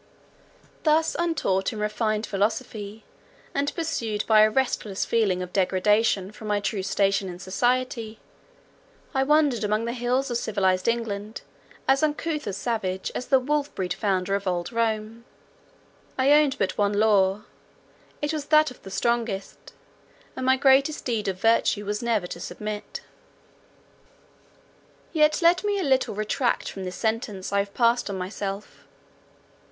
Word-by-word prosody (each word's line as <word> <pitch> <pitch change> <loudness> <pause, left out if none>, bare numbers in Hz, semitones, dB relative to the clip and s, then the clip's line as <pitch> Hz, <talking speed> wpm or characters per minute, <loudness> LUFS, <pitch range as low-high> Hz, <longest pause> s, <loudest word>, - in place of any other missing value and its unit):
Thus 315 +1 +2
untaught 310 - 0
in 220 - -7
refined 215 +1 -1
philosophy, 210 +1 -3 0.5
and 285 +1 0
pursued 245 - -2
by 215 -1 +6
a 215 - +6
restless 215 -5 -1
feeling 195 -6 +1
of 180 - -9
degradation 195 +1 +2
from 215 0 -10
my 205 -1 +1
true 200 0 -2
station 195 0 +1
in 175 - -7
society, 230 +3 -1 0.9
I 265 - +2
wandered 285 -4 +3
among 215 +2 0
the 235 - -2
hills 250 +2 0
of 240 - +1
civilized 190 -4 0
England 220 -2 -2 0.5
as 270 0 +4
uncouth 305 -1 -1
a 200 - -2
savage 190 -3 -2
as 250 - -4
the 265 - +5
wolf 290 +2 -1
bred 180 -2 -2
founder 195 -2 -1
of 200 0 -1
old 175 +1 -1
Rome. 225 0 -2 0.9
I 265 +2 +3
owned 295 -2 +4
but 190 -4 -1
one 205 0 +2
law, 205 -1 +3 0.8
it 295 +2 0
was 300 -2 -3
that 305 -1 +4
of 250 - -15
the 195 - -10
strongest, 230 -2 -2 0.6
and - - -4
my 260 0 +5
greatest 275 +3 +3
deed 225 -5 -1
of 190 -1 -2
virtue 225 -1 +2
was 210 +2 -2
never 230 -6 0
to 175 - -7
submit. 210 +3 -6 2.1
Yet 305 +1 +3
let 350 +3 +4
me 410 -1 0
a - - -1
little 265 -6 +1
retract 215 +4 -1
from 190 -1 -7
this 180 0 -5
sentence 220 -4 -2
I 200 - +3
have 200 0 -3
passed 235 -1 +2
on 195 - -3
myself. 195 +2 -6
220 Hz, 150 wpm, -25 LUFS, 200-260 Hz, 2.1 s, by